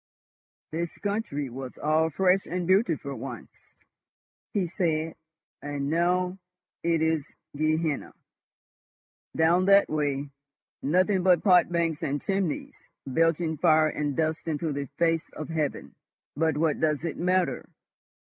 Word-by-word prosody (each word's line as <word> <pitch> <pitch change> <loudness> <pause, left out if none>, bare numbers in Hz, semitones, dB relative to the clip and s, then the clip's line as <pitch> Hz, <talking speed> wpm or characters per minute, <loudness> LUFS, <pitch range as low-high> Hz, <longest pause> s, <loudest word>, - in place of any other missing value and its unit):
"This 170 +1 -4
country 200 -9 -2
was 130 0 -7
all 155 +2 +2
fresh 190 +4 +2
and 180 0 -2
beautiful 175 -7 +1
once," 130 -5 -9 0.8
he 200 -4 0
said; 165 -3 -1 0.5
"and 145 0 -3
now—it 180 -1 -1
is 160 -3 0 0.2
Gehenna. 155 0 -1 1.2
Down 170 +3 +4
that 200 +1 +5
way—nothing 145 +5 -1
but 180 -2 +4
pot 180 -4 +5
banks 170 -3 0
and 145 0 -1
chimneys 190 -4 -3 0.2
belching 165 +3 +1
fire 155 -1 +4
and 145 -2 -2
dust 160 0 -1
into 155 0 -1
the 140 0 -3
face 165 -1 +1
of 155 - -7
heaven..... 155 -3 -2 0.4
But 160 0 +1
what 155 -1 +1
does 155 0 0
it 165 - -3
matter? 180 +1 0
160 Hz, 120 wpm, -27 LUFS, 150-180 Hz, 1.2 s, that